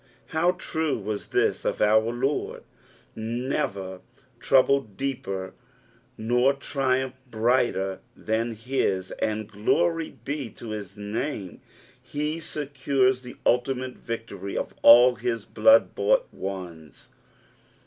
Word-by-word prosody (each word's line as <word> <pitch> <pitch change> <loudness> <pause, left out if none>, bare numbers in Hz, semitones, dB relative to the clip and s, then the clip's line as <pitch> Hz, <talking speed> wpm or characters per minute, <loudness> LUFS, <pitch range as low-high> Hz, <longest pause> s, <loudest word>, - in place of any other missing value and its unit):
How 170 +3 +2
true 160 -4 -2
was 105 -1 -4
this - - +1
of - - -1
our 110 +2 +4
Lord! 130 +4 -2 0.5
never 110 -5 -3 0.4
/trouble 135 -5 +3
deeper 95 -9 -3 0.6
nor 125 +4 +2
tnumph 130 -2 -1 0.2
brighter 110 -5 +1 0.2
than 115 +2 -1
his, 105 -5 -1
and 110 -1 -1
glory 165 +11 0
be 140 -4 -3
to 115 - -9
his 105 -2 -6
name, 105 - -4 0.4
he 150 +2 -3
1 - - -8
secures 135 -4 0
the 125 -1 -10
ultimate 125 +1 +1
victory 110 -5 -6
of - - -3
all 120 +1 +8
his 115 -3 -2
blood 280 0 +5
bought - - +2
ones. 90 -6 -7
120 Hz, 110 wpm, -26 LUFS, 105-135 Hz, 0.6 s, all